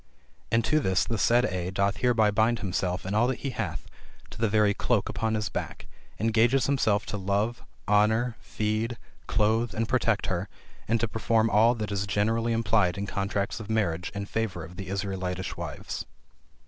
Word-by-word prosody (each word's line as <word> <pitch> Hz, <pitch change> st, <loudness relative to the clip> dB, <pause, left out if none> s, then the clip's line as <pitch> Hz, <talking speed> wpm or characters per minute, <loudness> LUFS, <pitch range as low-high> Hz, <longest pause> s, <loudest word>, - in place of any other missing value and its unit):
And 115 Hz, 0 st, +3 dB
to 155 Hz, -, +3 dB
this 95 Hz, -9 st, +2 dB
the 115 Hz, -2 st, -2 dB
said 120 Hz, +4 st, +4 dB
A 90 Hz, -3 st, -2 dB
doth 100 Hz, +1 st, 0 dB
hereby 115 Hz, -4 st, +3 dB
bind 110 Hz, +3 st, +2 dB
himself 90 Hz, -3 st, -2 dB
and 95 Hz, +2 st, -2 dB
all 115 Hz, +3 st, +4 dB
that 130 Hz, -, -2 dB
he 135 Hz, -, -2 dB
hath, -, -, -4 dB, 0.5 s
to -, -, -10 dB
the 115 Hz, -, +3 dB
very 105 Hz, -1 st, +3 dB
cloak 105 Hz, 0 st, 0 dB
upon 110 Hz, -1 st, -1 dB
his 105 Hz, -1 st, -1 dB
back; -, -, -5 dB, 0.3 s
engages 115 Hz, +4 st, +3 dB
himself 110 Hz, -7 st, +2 dB
to 105 Hz, -, -4 dB
love, 100 Hz, +4 st, -1 dB, 0.3 s
honor, 110 Hz, +3 st, +3 dB
feed, 110 Hz, +2 st, -2 dB, 0.3 s
clothe, 110 Hz, +2 st, +1 dB
and 115 Hz, 0 st, 0 dB
protect 115 Hz, -4 st, +1 dB
her, 95 Hz, +2 st, -2 dB, 0.4 s
and 115 Hz, +1 st, +2 dB
to 115 Hz, -, +1 dB
perform 115 Hz, 0 st, +1 dB
all 115 Hz, +3 st, +5 dB
that 105 Hz, -3 st, -4 dB
is 100 Hz, 0 st, -1 dB
generally 115 Hz, +4 st, +1 dB
implied 105 Hz, -5 st, +2 dB
in 100 Hz, -, -2 dB
contracts 100 Hz, +2 st, -2 dB
of 110 Hz, -1 st, -8 dB
marriage 90 Hz, -6 st, 0 dB
in 100 Hz, 0 st, -3 dB
favor 100 Hz, -6 st, -3 dB
of 85 Hz, +3 st, -12 dB
the 95 Hz, +1 st, -7 dB
Israelitish 95 Hz, -2 st, -3 dB
wives." -, -, -5 dB
105 Hz, 180 wpm, -27 LUFS, 100-115 Hz, 0.5 s, all